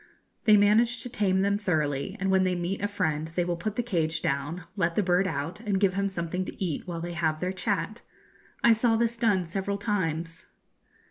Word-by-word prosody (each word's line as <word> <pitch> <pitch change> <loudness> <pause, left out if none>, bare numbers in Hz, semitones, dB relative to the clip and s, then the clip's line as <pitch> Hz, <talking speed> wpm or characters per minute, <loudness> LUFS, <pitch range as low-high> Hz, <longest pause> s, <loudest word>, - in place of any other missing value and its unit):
They 215 -2 +7
manage 230 +4 +3
to 245 - -6
tame 190 -5 +1
them 200 +1 +1
thoroughly, 160 -1 -1
and 195 0 0
when 190 0 +4
they 185 -1 +1
meet 175 +3 -2
a 205 - +1
friend 160 -6 -1
they 170 +2 -1
will 175 0 -1
put 205 +5 -4
the 245 - 0
cage 165 -8 -1
down, 145 +5 -2
let 170 -4 0
the 210 - +2
bird 180 +1 +2
out, 160 +3 -3
and 205 -4 -1
give 195 -2 +3
him 200 +1 0
something 180 -1 -3
to - - -8
eat 165 -3 -3
while 170 -2 -4
they 175 +1 -4
have 160 -2 0
their 180 +2 -1
chat. 185 -1 -2 0.6
I 235 - +7
saw 225 +1 +2
this 230 +1 +1
done 210 -6 +2
several 195 +4 -2
times. 170 -6 -2
185 Hz, 210 wpm, -27 LUFS, 170-205 Hz, 0.6 s, They